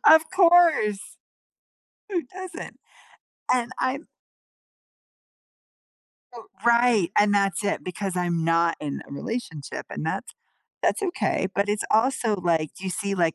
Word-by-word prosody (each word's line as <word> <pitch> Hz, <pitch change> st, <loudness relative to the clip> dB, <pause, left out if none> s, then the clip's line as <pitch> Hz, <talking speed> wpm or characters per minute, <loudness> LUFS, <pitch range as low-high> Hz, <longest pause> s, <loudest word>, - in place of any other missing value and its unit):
Of 315 Hz, +1 st, +9 dB
course. 335 Hz, -, +5 dB, 1.1 s
Who 365 Hz, -4 st, 0 dB
doesn't? 370 Hz, -1 st, -8 dB, 0.8 s
And 245 Hz, 0 st, 0 dB
I'm 270 Hz, +4 st, -2 dB, 2.3 s
oh 230 Hz, -2 st, -11 dB, 0.2 s
right, 235 Hz, -6 st, +4 dB
and 205 Hz, 0 st, +4 dB
that's 195 Hz, -1 st, +1 dB
it 200 Hz, -, -1 dB
because 185 Hz, +1 st, -4 dB
I'm 175 Hz, -2 st, 0 dB
not 165 Hz, 0 st, +2 dB
in 145 Hz, -2 st, -4 dB
a -, -, -10 dB
relationship, 165 Hz, -, -5 dB
and -, -, -5 dB
that's -, -, -4 dB, 0.5 s
that's 430 Hz, -, +1 dB
okay, 350 Hz, -, 0 dB
but 200 Hz, +1 st, 0 dB
it's 210 Hz, 0 st, 0 dB
also 225 Hz, -1 st, +2 dB
like 165 Hz, -4 st, 0 dB
you 190 Hz, -, -4 dB
see, 200 Hz, +1 st, -2 dB
like, 170 Hz, -4 st, +1 dB
205 Hz, 125 wpm, -25 LUFS, 175-255 Hz, 2.3 s, Of